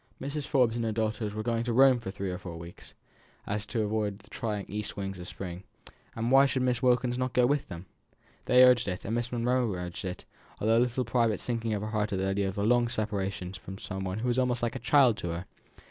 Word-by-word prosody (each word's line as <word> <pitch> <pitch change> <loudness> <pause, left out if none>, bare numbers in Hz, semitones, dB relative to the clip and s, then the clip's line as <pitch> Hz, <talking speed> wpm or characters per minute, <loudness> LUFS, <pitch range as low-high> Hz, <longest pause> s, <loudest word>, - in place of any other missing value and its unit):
Mrs. 140 +1 -4
Forbes 125 -5 +3
and 120 - -1
her 110 - 0
daughters 110 -1 -2
were 110 - -3
going 115 0 0
to 120 -1 -1
Rome 130 0 +6
for 115 - -6
three 95 -1 -4
or 90 - -5
four 90 -3 -7
months, 85 +1 -11
so - - -16 0.5
as 100 0 -2
to 110 +1 -1
avoid 105 -1 -1
the 105 +1 -22
trying 105 -3 -3
east 105 +2 -5
winds 95 -1 -4
of 90 - -8
spring; 90 -1 -7 0.5
why 130 +5 +5
should 130 -1 0
not - - +2
Miss 125 -2 +1
Wilkins 125 0 +2
go 125 - +4
with 145 +2 +1
them? 85 -1 -8 0.6
They 125 0 +7
urged 125 -3 +5
it, 90 -1 -4
and 110 - -2
Miss 120 +1 -1
Monro 125 -1 +1
urged 90 -1 -5
it, 90 -1 -5 0.3
though - - -3
with 110 - +3
a - - +5
little 125 +1 +1
private 115 -2 +1
sinking 115 -2 -2
of 100 - -3
the 105 - -4
heart 105 -1 -1
at - - 0
the 95 - -1
idea 95 0 0
of 95 - -6
the 100 - -1
long 120 +2 +3
separation 100 -5 -3
from 95 0 -8 0.3
one 95 +1 -3
who 115 +3 -2
was 125 +1 +2
almost 125 -2 0
like 120 - -1
a - - -3
child 125 -1 +4
to - - -4
her. 85 +2 -4
110 Hz, 250 wpm, -29 LUFS, 100-125 Hz, 0.6 s, They